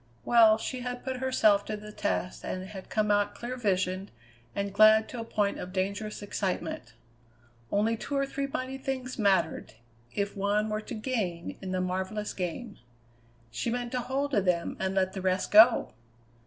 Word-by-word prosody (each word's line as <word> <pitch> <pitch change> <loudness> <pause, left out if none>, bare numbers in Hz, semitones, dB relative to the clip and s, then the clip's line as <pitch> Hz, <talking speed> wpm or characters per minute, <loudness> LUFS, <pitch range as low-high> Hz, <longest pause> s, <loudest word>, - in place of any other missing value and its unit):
Well, 225 -2 +6
she 255 +3 -4
had 245 0 -5
put 260 0 -3
herself 220 -6 +3
to 215 - -4
the 210 0 -10
test 195 -3 -2
and 185 +1 -4
had 190 -3 -9
come 210 -1 +1
out 205 0 +2
clear 245 +2 -5
visioned 190 -4 -1 0.5
and 200 -1 -2
glad 215 +1 +6
to 245 - -6
a - - -3
point 210 -3 -1
of 180 - -6
dangerous 200 +3 -3
excitement. 175 - -3 0.8
Only 220 +3 +2
two 280 +5 -3
or 275 - +2
three 275 0 -3
mighty 265 0 -4
things 260 -2 -4
mattered, 190 - +1 0.4
if 200 0 -1
one 205 +2 +1
were 215 0 -2
to 230 - -7
gain 215 -8 -3
in 190 -1 -5
the 185 0 0
marvellous 190 +3 -2
game. 195 +5 -5 0.7
She 120 - -2
meant 240 0 -2
to 255 - -1
hold 275 +3 -2
to 210 -7 +3
them 180 -2 0
and 190 0 -1
let 190 -1 +1
the 190 - -5
rest 185 0 0
go! 225 +3 +7
210 Hz, 180 wpm, -29 LUFS, 190-240 Hz, 0.8 s, go